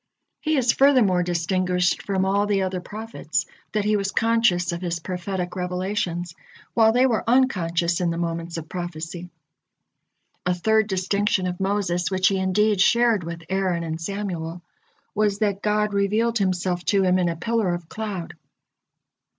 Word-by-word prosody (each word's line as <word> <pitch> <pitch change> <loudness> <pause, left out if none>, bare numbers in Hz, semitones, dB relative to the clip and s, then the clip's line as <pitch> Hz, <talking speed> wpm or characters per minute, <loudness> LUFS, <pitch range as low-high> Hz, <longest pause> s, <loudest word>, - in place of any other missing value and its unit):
He 310 -1 0
is 245 -2 +3
furthermore 250 -10 +4
distinguished 180 +1 0
from 190 -1 -1
all 200 +2 +1
the 200 -2 +1
other 185 -1 -2
prophets, 220 +4 -4 0.3
that 210 -1 -1
he 210 0 +2
was 200 -1 -1
conscious 225 -7 +2
of 170 0 -4
his 170 -2 -2
prophetic 180 +1 -4
revelations, 180 -1 -2 0.4
while 225 -1 +5
they 250 +3 +4
were 235 -4 +1
unconscious 175 -10 +2
in 175 - +1
the 165 - -2
moments 170 0 -3
of 160 -1 -6
prophecy. 175 0 -6 1.1
A 180 0 +1
third 220 +4 +2
distinction 190 0 0
of 180 -1 -3
Moses, 190 -2 0
which 185 -1 +3
he 195 -1 0
indeed 195 +2 +2
shared 235 -2 +4
with 170 0 -7
Aaron 185 -3 0
and 160 0 -4
Samuel, 175 -3 -4 0.5
was 210 -1 +1
that 205 -2 0
God 210 0 +1
revealed 215 +4 +1
Himself 180 -2 0
to 200 -2 +3
him 185 0 +3
in 175 -1 +2
a 165 - -2
pillar 220 +2 0
of 175 -2 -9
cloud. 200 -4 -5
190 Hz, 160 wpm, -23 LUFS, 175-210 Hz, 1.1 s, while